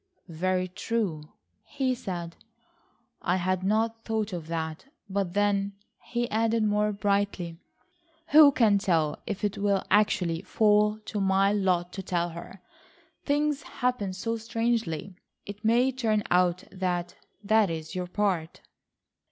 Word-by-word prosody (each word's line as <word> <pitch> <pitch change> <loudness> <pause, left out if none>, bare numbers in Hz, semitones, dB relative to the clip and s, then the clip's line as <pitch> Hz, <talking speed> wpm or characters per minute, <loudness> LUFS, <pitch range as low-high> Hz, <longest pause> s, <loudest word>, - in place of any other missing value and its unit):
"Very 185 +3 0
true," 185 -3 -2 0.4
he 260 +2 -1
said, 175 -7 -5 0.9
"I 180 - +1
had 185 0 0
not 225 +3 0
thought 220 -2 -2
of 165 -3 -5
that. 160 +1 -4 0.2
But 195 -2 -2
then," 200 -1 +1 0.3
he 240 0 -1
added 225 +1 +2
more 210 0 +2
brightly, 200 -4 -1 0.7
"who 300 -1 +8
can 215 -6 +3
tell 165 -7 0
if 205 0 -4
it 205 -1 -1
will 200 -1 +1
actually 180 -5 +2
fall 210 +2 +3
to 210 - -3
my 195 +1 +3
lot 180 -3 0
to 195 - -4
tell 175 -2 -1
her. 170 +3 -10 0.6
Things 295 0 +1
happen 250 -9 -2
so 230 +5 -3
strangely. 225 - -2 0.3
It 205 +1 -9
may 240 +4 +3
turn 220 -5 0
out 180 0 +3
that 180 -2 -2 0.3
that 215 -1 +3
is 160 0 -5
your 180 -1 -3
part." 180 -4 -1
200 Hz, 135 wpm, -27 LUFS, 180-220 Hz, 0.9 s, who